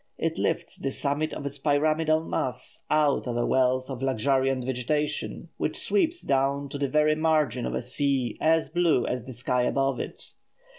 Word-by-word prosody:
It - - -2
lifts - - -1
the 135 - -3
summit 145 +3 -1
of 140 - -6
its 140 0 -4
pyramidal 155 +2 +2
mass 125 -5 -2
out 150 -3 +2
of 120 -1 -2
a 120 - +1
wealth 130 0 +2
of 130 -2 -6
luxuriant 135 0 +1
vegetation, 150 +4 -2
which - - -2
sweeps 350 -3 +1
down 140 +1 0
to 140 - -6
the 140 -1 0
very 150 +1 +3
margin 155 -5 +1
of - - -3
a - - -2
sea 130 -1 0
as 160 0 +3
blue 170 -8 +2
as 125 -1 -3
the 130 - -7
sky 125 +1 0
above 135 +1 +1
it. - - -6
140 Hz, 180 wpm, -26 LUFS, 130-155 Hz, -, very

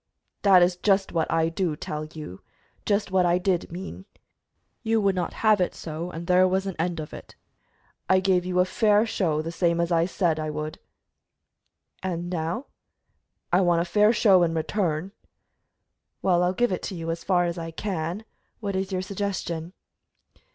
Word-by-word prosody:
"That 190 -3 +6
is 175 0 +1
just 195 +1 +2
what 165 -2 0
I 165 0 +2
do 165 -1 -1
tell 150 +1 -5
you 155 - -9 0.5
just 205 -1 +1
what 190 -1 +3
I 175 0 +3
did 180 -2 -1
mean. 190 +2 -7 0.8
You 225 -1 +1
would 200 -2 +2
not 180 -2 -2
have 215 -3 +5
it 180 - 0
so, 165 +2 -5
and 170 -1 -7
there 180 +1 +5
was 190 +1 0
an 195 -2 -4
end 170 0 -1
of 150 - -7
it. - - -11 0.7
I 190 - +5
gave 185 -1 +2
you 180 0 -1
a 180 - +5
fair 210 +2 +3
show, 165 -9 0
the 165 - -4
same 170 0 +1
as 170 +1 0
I 165 0 +3
said 170 -4 0
I 155 0 -2
would." 155 +1 -5 1.2
"And 175 -1 -3
now?" 170 - -2 0.9
"I 180 - +5
want 175 -2 +3
a - - -6
fair 210 +4 +4
show 200 -5 +5
in 165 -1 +1
return." 165 0 -1 1.1
"Well, 180 -2 +3
I'll 180 0 +2
give 240 +3 +1
it 185 - -2
to 195 - -6
you, 165 -1 -3
as 165 0 -5
far 180 -2 +2
as 170 0 -3
I 165 0 -5
can. 180 +2 -4 0.3
What 200 -3 -3
is 190 +1 -2
your 185 -1 -1
suggestion?" 185 -4 -3
180 Hz, 185 wpm, -25 LUFS, 165-195 Hz, 1.2 s, That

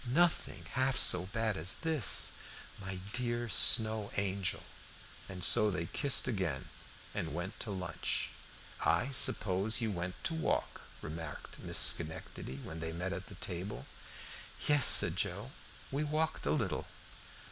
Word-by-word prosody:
"Nothing 170 +6 0
half 130 -1 0
so 90 +1 +5
bad 110 +1 -3
as 80 +4 0
this 160 -9 +3 0.5
my 95 -1 -7 0.2
dear 120 -1 -2
Snow 110 -1 +5
Angel!" 100 -2 -3 0.7
And 90 -2 -5
so 105 - +6
they 90 -4 -4
kissed 140 - +1
again 95 - -4 0.4
and 80 - -5
went 95 +5 -7
to - - -7
lunch. 95 -4 -3 0.5
"I 130 +3 0
suppose 105 -4 +2
you 110 -2 -2
went 90 -1 -5
to - - -2
walk," 160 -1 -3 0.2
remarked 80 -1 -9
Miss - - -2
Schenectady, 80 -4 +2
when 80 - -9
they 80 0 -5
met 90 +3 -4
at 100 0 -9
table. 95 +3 -6 0.8
"Yes," 145 -3 +5
said 85 +2 +7
Joe, 100 +5 -3 0.4
"we 140 +3 -2
walked 155 +1 -3
a - - 0
little." - - -3
100 Hz, 135 wpm, -32 LUFS, 90-125 Hz, 0.8 s, said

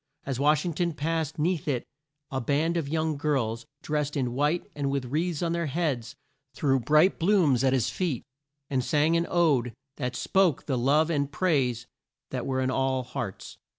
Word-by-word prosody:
As 135 -2 -3
Wash 150 +2 +3
ing 175 - -1
ton 170 +2 0
passed 160 0 -2
'neath 160 0 0
it 130 -5 -1 0.5
a 135 -1 -1
band 150 +6 +1
of 160 -5 -1
young 155 -1 0
girls, 130 -5 -1 0.2
drest 150 -1 -1
in 125 -3 -1
white 150 +6 +1
and 140 -2 -2
with 135 -2 -1
wreaths 160 +5 -1
on 170 - 0
their 170 -1 -1
heads, 140 -6 -2 0.4
threw 135 -3 +2
bright 150 - +3
blooms 165 - +3
at 130 - +4
his 130 -3 +1
feet, 165 -10 -2 0.4
and 130 -2 0
sang 155 +2 +2
an 170 0 +1
ode 140 -9 +2 0.2
that 125 -3 -3
spoke 185 0 +2
the 135 - -1
love 145 +6 +3
and 140 -2 0
praise 135 -9 +1 0.5
that 125 -2 -3
were 130 -1 0
in 130 0 0
all 130 -1 0
hearts. 120 -5 -6
145 Hz, 185 wpm, -27 LUFS, 130-165 Hz, 0.5 s, at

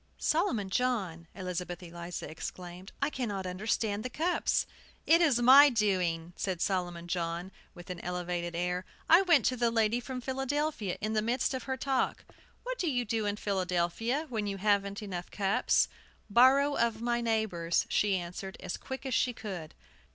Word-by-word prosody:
"Solomon 245 - 0
John!" 195 -10 -1
Elizabeth 180 -2 -4
Eliza 170 0 -6
exclaimed; 180 +3 -8
"I 290 - +1
cannot 205 -9 -3
understand 205 +3 -1
the 255 - -3
cups!" 335 +7 +1 0.4
"It 335 +2 +5
is 285 -8 +4
my 275 +4 +9
doing," 180 -7 0
said 185 -3 -2
Solomon 175 -2 -1
John, 170 +1 -3 0.2
with 175 +1 -9
an 180 - -6
elevated 175 -1 -3
air. 180 +1 -1 0.2
"I 335 +3 +8
went 340 -6 +4
to 255 - +2
the 240 -1 +2
lady 225 0 +2
from 255 +1 -5
Philadelphia, 270 - -2
in 215 +1 -1
the 215 - +2
midst 240 +5 0
of 260 -2 -4
her 265 -1 -2
talk. 265 -1 -1 0.4
'What - - -4
do 345 - +1
you 245 -3 0
do 220 -1 -1
in 205 - 0
Philadelphia, 195 - -1
when 220 -4 -2
you 200 -1 -3
haven't 200 0 +1
enough 180 -3 -5
cups?' 195 -1 +2 0.4
'Borrow 275 +5 +5
of 230 -1 +1
my 240 +1 0
neighbors,' 220 -7 0
she 200 -2 +2
answered, 180 +2 -6
as - - -4
quick 265 +1 -7
as 265 - -2
she 245 +1 +2
could." 190 -9 -7
210 Hz, 165 wpm, -30 LUFS, 180-250 Hz, 0.4 s, my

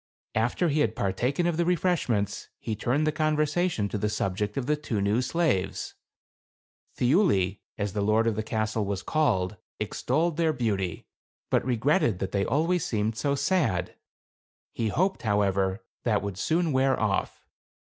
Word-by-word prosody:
After 120 +10 +1
he 150 +1 +1
had 115 -6 +1
partaken 125 - 0
of 170 -2 +1
the 170 - +3
refreshments, 165 - 0
he 110 - -4
turned 130 +8 0
the 155 - +2
conversation 155 - +1
to 105 - -3
the 105 - 0
subject 105 +1 -2
of 135 - -1
the 150 +3 +2
two 145 -8 -3
new 100 +4 +2
slaves. 130 - 0 1.0
Thiuli 110 - +3 0.2
(as 100 -2 -2
the 105 - -1
lord 110 +2 +3
of 115 -2 +1
the 110 - -1
castle 110 0 -1
was 100 -1 -3
called) 105 -11 +1 0.2
extolled 150 +9 0
their 165 -2 +2
beauty, 100 - -2 0.5
but - - +3
regretted 125 - +2
that 95 0 -3
they 100 -1 +1
always 165 +4 +1
seemed 110 0 -1
so 140 +5 0
sad; 140 - 0 0.8
he 115 - -1
hoped, 185 - 0
however, 100 -2 +1 0.2
that 110 -4 +1
would 100 -2 -4
soon 165 - +1
wear 130 0 +2
off. 105 -3 -1
115 Hz, 155 wpm, -27 LUFS, 100-155 Hz, 1.0 s, the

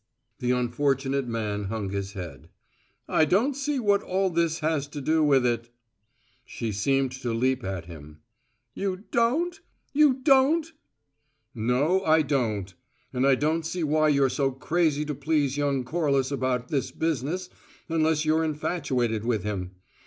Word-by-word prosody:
The 125 - -2
unfortunate 135 +2 0
man 105 -3 -2
hung 100 -1 -3
his 100 0 -4
head. 85 -4 -8 0.6
"I - - +3
don't 215 - +2
see 280 +1 -1
what 205 -4 +2
all 190 0 0
that 165 -1 +1
has 155 -3 -1
to 145 0 -7
do 155 +3 +2
with 135 -4 +4
it 120 -1 -1 0.4
" - - -46 0.3
She 115 -2 -4
seemed 135 +6 +1
to 120 - -2
leap 130 +2 0
at 95 -3 -4
him. 75 -2 -12 0.5
"You 195 +2 -3
don't? 300 +10 +1 0.3
You 290 -2 +5
don't?" 300 +4 +4 0.8
"No, 130 - +1
I 160 -2 +4
don't. 110 -10 -1 0.4
And 130 +2 +2
I 135 - +5
don't 155 +4 0
see 170 +2 -3
why 155 0 +3
you're 140 -2 +4
so 135 +1 0
crazy 150 +2 0
to 150 - -3
please 145 -2 0
young 140 -2 0
Corliss 140 -1 0
about 130 -2 -1
this 140 -3 -1
business 165 +4 -2 0.4
unless 160 -1 +1
you're 160 +1 +2
infatuated 135 -8 -1
with 115 -5 0
him. 95 -3 -4
140 Hz, 155 wpm, -26 LUFS, 120-165 Hz, 0.8 s, You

